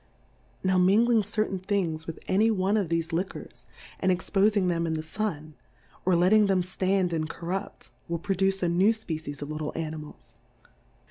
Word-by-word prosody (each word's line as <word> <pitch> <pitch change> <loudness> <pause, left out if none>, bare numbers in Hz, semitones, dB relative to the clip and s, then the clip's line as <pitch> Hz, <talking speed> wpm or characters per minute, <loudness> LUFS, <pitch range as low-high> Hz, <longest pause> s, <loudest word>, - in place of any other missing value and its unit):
Now 185 0 +3
mingling 220 +5 +4
certain 205 -1 -1
Things 180 -5 -2
with 165 - -7
any 210 +4 +3
one 200 -1 +1
of 200 -6 0
thefe 165 0 -1
Liquors, 180 +4 -5 0.3
and 185 - +2
expofmg 195 +2 +2
them 170 -1 0
in 160 - -1
the 155 0 -3
Sun, 160 -3 -4 0.5
or 185 -1 +4
letting 200 +5 +5
them 190 -2 +2
Itand 185 0 0
and 155 -1 -1
corrupt, 185 +5 -5 0.2
will 170 -1 -2
produce 195 +2 0
a - - +3
new 190 +6 +4
Species 155 -9 -6
of 145 - -6
little 155 -1 -3
Animals. 155 - -7
185 Hz, 160 wpm, -27 LUFS, 165-200 Hz, 0.5 s, letting